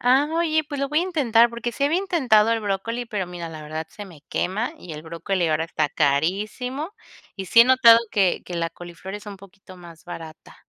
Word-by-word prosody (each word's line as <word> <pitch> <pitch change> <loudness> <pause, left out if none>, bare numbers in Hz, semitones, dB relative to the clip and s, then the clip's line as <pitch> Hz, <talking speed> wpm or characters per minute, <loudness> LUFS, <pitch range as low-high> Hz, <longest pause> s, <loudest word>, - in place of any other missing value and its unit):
Ah, 260 +4 +3
oye, 320 -1 +1
pues 285 -3 -4
lo 275 - -1
voy 300 +3 +2
a - - +1
intentar 245 -10 +3
porque 235 0 -5
sí 280 - -1
había 320 +5 +2
intentado 250 - +3
el 225 - 0
brócoli, 215 +4 -3
pero 205 -4 -3
mira, 175 -1 -7
la 155 -1 -9
verdad 155 +1 -5
se 205 - -10
me 175 -7 -14
quema 215 - -2
y 175 - -9
el 150 0 -8
brócoli 170 +2 -2
ahora 155 +1 +1
está 155 -2 -1
carísimo, 210 - -1 0.4
y 190 -1 -6
sí 230 +6 +6
he - - +9
notado 245 -3 +7
que 195 -3 +1
que 180 - -7
la 165 -1 -2
coliflor 175 +3 -9
es 210 0 -9
un 205 -1 -7
poquito 190 -1 -15
más 170 -2 -14
barata. 165 -2 -10
205 Hz, 220 wpm, -23 LUFS, 170-250 Hz, 0.4 s, he